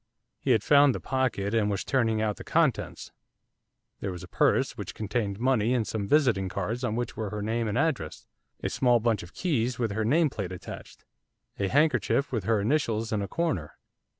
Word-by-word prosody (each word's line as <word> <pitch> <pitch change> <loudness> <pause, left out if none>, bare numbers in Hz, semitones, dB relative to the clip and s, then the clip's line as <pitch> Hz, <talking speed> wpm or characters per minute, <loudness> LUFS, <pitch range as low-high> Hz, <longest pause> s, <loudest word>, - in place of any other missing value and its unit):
He - - -4
had 115 -5 +4
found 140 0 +5
the - - -3
pocket, 130 -6 -1
and 110 -2 +2
was 100 -2 -1
turning 115 -5 +1
out 105 -2 -1
the - - -8
contents. - - 0 0.9
There 100 - -3
was 90 -2 -7
a - - -9
purse, - - +2
which - - -7
contained 105 -1 -2
money 125 -1 +2
and 115 -3 +1
some 105 -1 -3
visiting 115 -9 +3
cards 105 +6 -3
on 110 -3 -1
which 120 +1 -3
were 110 -3 -3
her 105 0 -4
name 115 +1 -1
and 105 +2 -1
address; 140 - -1 0.4
a - - 0
small 120 -2 +3
bunch 115 -2 +1
of 85 +2 -13
keys, 125 -9 0
with 115 -4 -1
her 110 +2 -1
nameplate 125 - +1
attached; 90 - -9 0.5
a 100 - +1
handkerchief, 145 +2 +2
with 110 -7 -2
her 110 0 +2
initials 115 -1 0
in 105 - 0
a 100 - -3
corner. 100 - -2
115 Hz, 195 wpm, -27 LUFS, 100-130 Hz, 0.9 s, found